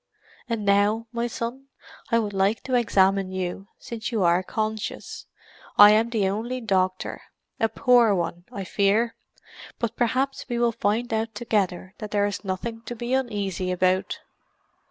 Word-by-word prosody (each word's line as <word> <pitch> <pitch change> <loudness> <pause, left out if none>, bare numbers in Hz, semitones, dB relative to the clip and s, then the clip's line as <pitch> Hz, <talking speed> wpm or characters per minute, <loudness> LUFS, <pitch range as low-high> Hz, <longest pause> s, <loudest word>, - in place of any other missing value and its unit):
And 225 -3 -2
now, 205 +3 +3
my 235 0 -1
son, 240 +3 -5 0.4
I 230 - +3
would 210 -3 -1
like 195 +3 +1
to 260 - -4
examine 195 -5 +3
you, 185 +1 -4
since 235 0 -6
you 220 -5 +1
are 175 +1 +4
conscious. 215 +2 -4 0.5
I 205 0 +10
am 220 +2 +3
the 215 -5 +1
only 230 +6 -2
doctor—a 190 +1 -2
poor 240 -6 +4
one, 175 0 -3
I 200 - -5
fear. 205 +5 +1 0.6
But 235 -1 -2
perhaps 260 +3 0
we 240 - -1
will 235 0 +3
find 225 +2 -1
out 220 0 -1
together 195 -4 -1
that 215 - -6
there 205 0 +1
is 205 +1 -3
nothing 220 +4 -4
to 240 - -4
be 240 +2 -3
uneasy 205 -8 -1
about." 185 +1 +1
215 Hz, 155 wpm, -25 LUFS, 195-235 Hz, 0.6 s, I